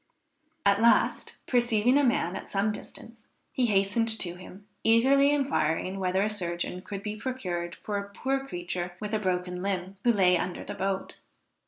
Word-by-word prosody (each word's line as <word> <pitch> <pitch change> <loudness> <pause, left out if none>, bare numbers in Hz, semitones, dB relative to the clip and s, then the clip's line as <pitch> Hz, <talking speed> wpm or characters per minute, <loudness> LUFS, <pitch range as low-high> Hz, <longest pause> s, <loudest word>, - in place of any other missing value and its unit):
At 200 +1 +4
last, 235 0 +3
perceiving 240 0 +3
a 290 - +4
man 210 -8 +1
at - - -7
some 200 +2 +1
distance, 225 +2 -10 0.2
he 250 -2 +1
hastened 205 +2 +2
to 175 -5 -1
him, 185 +2 -12 0.2
eagerly 265 +5 +5
inquiring 195 - 0
whether 190 +1 +1
a - - +1
surgeon 180 -3 -3
could 200 +1 -7
be 210 0 -3
procured 185 -8 -4
for 205 -1 -4
a 200 0 -7
poor 270 +6 -2
creature 175 -5 -4
with 210 0 -5
a 215 - +2
broken 180 -2 -2
limb, 190 0 -3
who 240 - +5
lay 185 -4 +4
under 180 - -4
the - - -6
boat. 195 0 -3
200 Hz, 170 wpm, -28 LUFS, 180-230 Hz, 0.2 s, eagerly